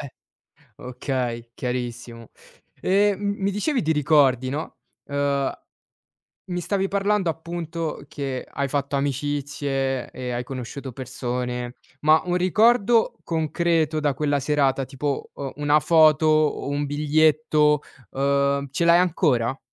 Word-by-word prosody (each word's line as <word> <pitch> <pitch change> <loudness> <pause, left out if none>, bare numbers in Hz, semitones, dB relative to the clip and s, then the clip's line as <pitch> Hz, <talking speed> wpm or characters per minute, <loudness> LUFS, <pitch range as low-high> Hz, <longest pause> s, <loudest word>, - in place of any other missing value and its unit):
Eh 140 -3 -7 0.7
Okay, 125 -2 -4
chiarissimo. 120 -2 -5 0.5
E 200 +2 +3
m 200 +1 -1
mi 195 +1 +1
dicevi 245 +7 0
di 160 - 0
ricordi, 140 -4 +3
no, 145 +4 -5 0.3
uhm, 140 -1 0 1.0
mi 180 -1 -3
stavi 195 +2 -1
parlando 200 -2 +1
appunto 165 0 -5
che 135 -3 -4
hai 140 0 -2
fatto 140 0 -1
amicizie 140 -1 -2
e 125 -1 -5
hai 120 0 -2
conosciuto 130 +1 -7
persone. 125 0 -4 0.3
Ma 155 +1 +4
un 180 0 0
ricordo 225 +4 +3
concreto 160 -1 0
da 145 -2 +1
quella 145 -1 0
serata 140 -1 +1
tipo, 140 +1 -3
uhm, 140 -2 -5
una 145 +1 +3
foto 155 0 +5
o 155 -2 +2
un 145 +1 -1
biglietto, 150 0 +3 0.3
uhm, 140 +1 +1
ce 155 +5 -1
l'hai 170 0 +6
ancora? 140 -8 +1
145 Hz, 125 wpm, -23 LUFS, 135-165 Hz, 1.0 s, l'hai